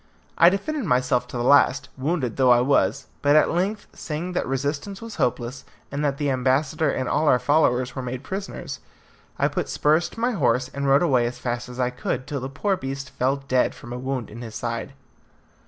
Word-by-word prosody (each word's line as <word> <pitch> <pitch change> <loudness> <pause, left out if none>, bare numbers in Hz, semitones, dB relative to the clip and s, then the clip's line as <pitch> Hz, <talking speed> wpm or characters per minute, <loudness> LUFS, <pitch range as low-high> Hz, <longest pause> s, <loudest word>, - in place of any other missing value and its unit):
I 170 - +7
defended 235 +8 -2
myself 125 -3 +1
to - - -6
the 120 - -1
last, 140 +1 +4
wounded 135 -3 -1
though 130 -2 +3
I 120 -1 +7
was, 140 +3 +2 0.2
but 145 +1 +4
at 155 - +5
length, 195 +5 -1
seeing 165 +3 -4
that - - -1
resistance 145 +9 -2
was 230 -2 -8
hopeless, 120 +1 -1 0.3
and 140 +2 -2
that 140 -2 0
the 145 -1 0
ambassador 135 +4 +1
and 130 - -1
all 155 +1 +1
our 125 - +6
followers 130 -2 +2
were 135 - -3
made 125 +1 -5
prisoners, 195 +1 -5 0.6
I - - +3
put - - -3
spurs 155 +3 +2
to - - -11
my 240 +2 +1
horse 125 - +1
and 140 +1 -3
rode 140 +4 +5
away 130 -8 +3
as 120 - -6
fast 120 0 -3
as 125 +1 -9
I 125 0 +1
could, 125 +1 -3
till 145 -2 -3
the 130 +1 -5
poor 195 +8 0
beast 135 -1 -5
fell 135 +2 0
dead 130 -1 +2
from 120 -1 -9
a 125 - -5
wound 130 -3 -3
in 115 +3 -9
his 115 -2 -8
side. 115 +3 -4
135 Hz, 210 wpm, -24 LUFS, 125-155 Hz, 0.6 s, I